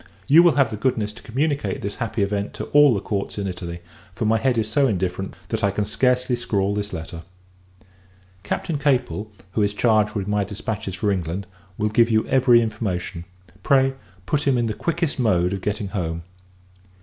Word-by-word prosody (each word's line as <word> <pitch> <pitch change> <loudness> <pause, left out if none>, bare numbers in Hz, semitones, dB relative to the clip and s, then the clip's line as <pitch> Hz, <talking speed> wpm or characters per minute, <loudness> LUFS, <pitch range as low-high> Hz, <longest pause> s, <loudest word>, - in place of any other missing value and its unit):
You 150 +5 +7
will 170 -5 +5
have 140 -5 +3
the 105 - -4
goodness 110 -3 0
to - - -13
communicate 140 -4 -1
this 100 +1 -4
happy 115 -3 -1
event 100 0 -2
to - - -4
all 145 -4 +7
the - - 0
courts 100 +1 -3
in 100 - -2
Italy; 85 -2 -5 0.3
for 115 - -2
my 110 +1 +3
head 125 0 +1
is 110 -1 +1
so 135 +5 +2
indifferent, 95 -2 -2
that 110 -1 -2
I 100 - +4
can 100 +1 -1
scarcely 125 +3 +1
scrawl 100 -4 0
this 105 0 -3
letter. 80 -1 -6 1.2
Captain 145 - -2
Capel, 125 - 0 0.2
who 110 - 0
is 100 0 +1
charged 110 -2 +2
with 100 -2 -2
my 105 0 +1
dispatches 105 -1 -4
for 100 +2 0
England, 90 +1 -2 0.3
will 105 0 0
give 115 +2 +4
you 110 -1 +2
every 125 -3 +5
information. 95 -6 -3 0.4
Pray, 135 +2 +3 0.3
put 145 +8 0
him 135 -2 +3
in 120 - +1
the 110 - -1
quickest 170 - -2
mode 90 -6 +2
of 95 - -4
getting 105 +1 -2
home. 85 -4 -3
105 Hz, 190 wpm, -23 LUFS, 100-125 Hz, 1.2 s, You